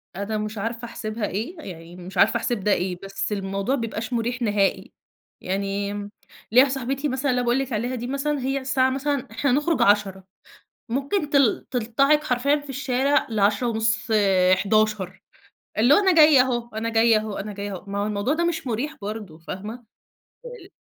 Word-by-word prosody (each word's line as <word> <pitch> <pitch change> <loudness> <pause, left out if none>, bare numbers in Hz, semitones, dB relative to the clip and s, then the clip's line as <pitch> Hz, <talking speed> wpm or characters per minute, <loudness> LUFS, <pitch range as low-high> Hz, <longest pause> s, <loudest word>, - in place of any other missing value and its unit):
أنا 205 +2 -3
مش 215 +1 -4
عارفة 230 +3 -4
أحسبها 215 -2 -4
إيه، 225 - -4
يعني 170 - -10
مش 180 +1 -9
عارفة 235 - +4
أحسب 235 -1 -2
ده 205 +2 0
إيه، 180 0 -1
بس 195 +2 -4
الموضوع 195 +5 -1
ما 235 - -3
بيبقاش 225 +1 -4
مُريح 240 +2 -1
نهائي. 205 -3 0 0.5
يعني 200 +1 -2 0.6
ليَّ 245 - +6
واحدة 275 - +3
صاحبتي 270 +3 -2
مثلًا 260 +1 0
اللي 250 - +1
أنا - - -3
باقول 245 +3 +3
لكِ 265 -3 -3
عليها 240 +4 -1
دي 245 +1 -5
مثلًا، 280 +2 -1
هي 270 +1 -1
الساعة 260 -1 +1
مثلًا، 275 0 -2
إحنا 265 +3 0
هنخرج 295 +5 +1
10:00 200 -2 +2 0.7
ممكن 280 - -1
تل 275 -6 +3
تلطعك 275 +6 +2
حرفيًا 275 +2 +2
في 290 -1 -13
الشارع 270 +1 +1
ل10:30، 220 +1 +1 0.4
11:00، 210 -2 0 0.6
اللي 245 +6 +5
هو - - +6
أنا 380 -3 +3
جاية 305 -3 +7
أهو، 240 -2 -1
أنا 225 +1 -2
جاية 225 0 +4
أهو، 215 -1 -4
أنا 210 +1 -5
جاية 200 0 -5
أهو. 180 - -9
ما 200 0 -3
هو 205 - 0
الموضوع 210 +6 0
ده 340 +2 0
مش 330 -5 -2
مُريح 250 +7 -2
برضه، 205 -6 -6
فاهمة. 190 +6 -7 0.8
أ - - -8
ال - - -14
230 Hz, 185 wpm, -24 LUFS, 205-270 Hz, 0.8 s, جاية